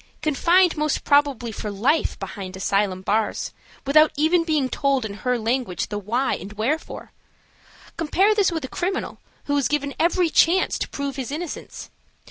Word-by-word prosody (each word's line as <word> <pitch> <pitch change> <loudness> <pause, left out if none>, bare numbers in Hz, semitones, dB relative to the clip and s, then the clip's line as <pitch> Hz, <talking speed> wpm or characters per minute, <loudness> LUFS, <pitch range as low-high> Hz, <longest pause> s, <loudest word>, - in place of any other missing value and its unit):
Confined 340 +4 +3
most 300 -1 0
probably 285 -5 +2
for 210 0 -5
life 235 +11 0
behind 190 -2 -7
asylum 195 -1 0
bars, 215 +2 -1 0.3
without 305 +3 +5
even 325 +3 +3
being 305 -5 +1
told 270 -2 0
in 205 - -5
her 250 -1 +1
language 230 -4 -2
the 205 -1 -3
why 240 +7 0
and 195 +4 -6
wherefore. 250 +10 -3 0.9
Compare 375 +6 +2
this 410 -3 +2
with 320 -4 -3
a - - -5
criminal, 370 +7 -3 0.2
who 285 - -1
is 275 -4 +2
given 285 -1 -1
every 345 0 +2
chance 355 +5 +3
to - - -3
prove 280 -1 -4
his 260 -4 -4
innocence. 315 +3 -6
280 Hz, 160 wpm, -23 LUFS, 220-320 Hz, 0.9 s, without